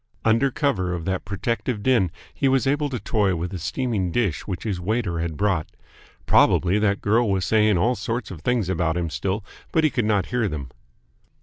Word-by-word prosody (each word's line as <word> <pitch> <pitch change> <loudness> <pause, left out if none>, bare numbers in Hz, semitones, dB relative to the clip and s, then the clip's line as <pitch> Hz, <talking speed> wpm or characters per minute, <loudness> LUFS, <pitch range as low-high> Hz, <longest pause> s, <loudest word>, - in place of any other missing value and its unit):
Under 115 +5 +4
cover 110 -10 0
of 85 -2 -5
that 95 -1 -2
protective 105 +3 -2
din 120 -9 +3 0.2
he 135 - 0
was 135 0 +2
able 145 +2 +1
to 125 -3 -3
toy 100 -6 +1
with 85 +3 -4
a 95 - -4
steaming 100 - -1
dish 100 -6 -1
which 95 -3 -4
his 100 -5 -2
waiter 95 -2 -1
had 80 -2 -3
brought. 95 -6 +1 0.6
Probably 90 +4 +4
that 100 -1 +1
girl 110 +2 +2
was 95 -2 +1
saying 110 -3 +3
all 115 +9 +2
sorts 115 +1 -3
of 85 -5 -8
things 120 -1 0
about 85 -2 0
him 85 -2 -2
still 100 +4 -2 0.3
but 160 - +2
he 155 - +3
could 120 -3 0
not 105 -4 +2
hear 120 -3 +2
them. 70 -8 -5
105 Hz, 200 wpm, -23 LUFS, 90-120 Hz, 0.6 s, Under